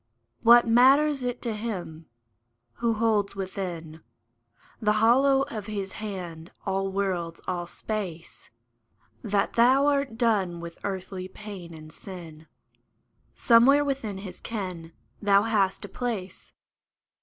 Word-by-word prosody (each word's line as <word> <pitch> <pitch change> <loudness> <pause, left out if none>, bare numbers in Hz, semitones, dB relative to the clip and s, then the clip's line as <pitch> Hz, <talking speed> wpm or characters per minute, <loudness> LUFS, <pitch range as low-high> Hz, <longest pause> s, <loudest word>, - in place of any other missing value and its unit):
What 235 +1 +7
matters 270 +5 +5
it 245 0 -3
to 235 -3 -2
Him, 185 -8 -6 0.7
who 235 -1 +1
holds 215 -3 +1
within 175 -5 -5 0.8
The 210 -1 +2
hollow 265 +5 +4
of 220 -7 -6
His 200 -3 -4
hand 180 -6 -7 0.2
all 195 0 -1
worlds, 180 -4 -2
all 175 -1 -2
space, 185 -5 -6 0.7
That 200 - 0
thou 255 +4 +5
art 280 -5 +1
done 200 -8 +1
with 170 0 -9
earthly 190 -1 -4
pain 190 -3 -9
and 155 0 -12
sin? 165 -3 -11 0.9
Somewhere 265 +5 +5
within 260 -8 -3
His 190 -1 -9
ken 185 -7 -5 0.3
thou 200 -1 +4
hast 205 -3 +1
a - - -10
place. 200 -5 -5
200 Hz, 120 wpm, -26 LUFS, 180-230 Hz, 0.9 s, What